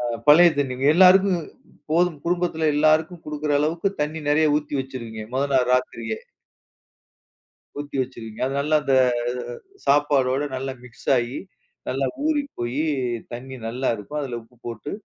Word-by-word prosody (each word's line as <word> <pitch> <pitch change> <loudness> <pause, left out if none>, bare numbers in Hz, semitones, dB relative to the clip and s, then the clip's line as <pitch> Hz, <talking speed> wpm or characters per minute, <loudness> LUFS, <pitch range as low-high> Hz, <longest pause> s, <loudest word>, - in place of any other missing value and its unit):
அ 120 -1 -2
பழைய 170 +4 +8
தண்ணி. 135 -3 0 0.2
எல்லாருக்கும் 185 0 +6 0.5
போதும், 165 -2 +2
குடும்பத்துல 170 -3 +1
எல்லாருக்கும் 155 +3 +2
குடுக்கிற 150 0 -2
அளவுக்கு 165 +5 0
தண்ணி 150 +2 -1
நெறைய 150 0 +3
ஊத்தி 150 -1 -8
வச்சுருவீங்க 115 -4 -7
மொத 135 - +1
நாள் 125 -1 +3
ராத்திரியே. 115 -3 -2 1.6
ஊத்தி 145 -1 -5
வச்சுருவீங்க. 115 -4 -7
அது 135 - -4
நல்ல 150 +2 -1
இந்த 135 -2 +2 0.9
சாப்பாடோட 140 -2 +3
நல்லா 135 +1 -3
மிக்ஸ் 120 -2 -13
ஆயி 120 +2 -3 0.5
நல்லா - - 0 0.2
ஊறி 305 -2 +2 0.2
போயி, 120 +5 -1 0.5
தண்ணி 130 +2 -7
நல்லா 125 +4 -2
இருக்கும். 110 +9 -5
அதுல 125 -4 -4
உப்பு 120 +2 -24
போட்டு 120 +4 -6
145 Hz, 135 wpm, -23 LUFS, 125-155 Hz, 1.6 s, பழைய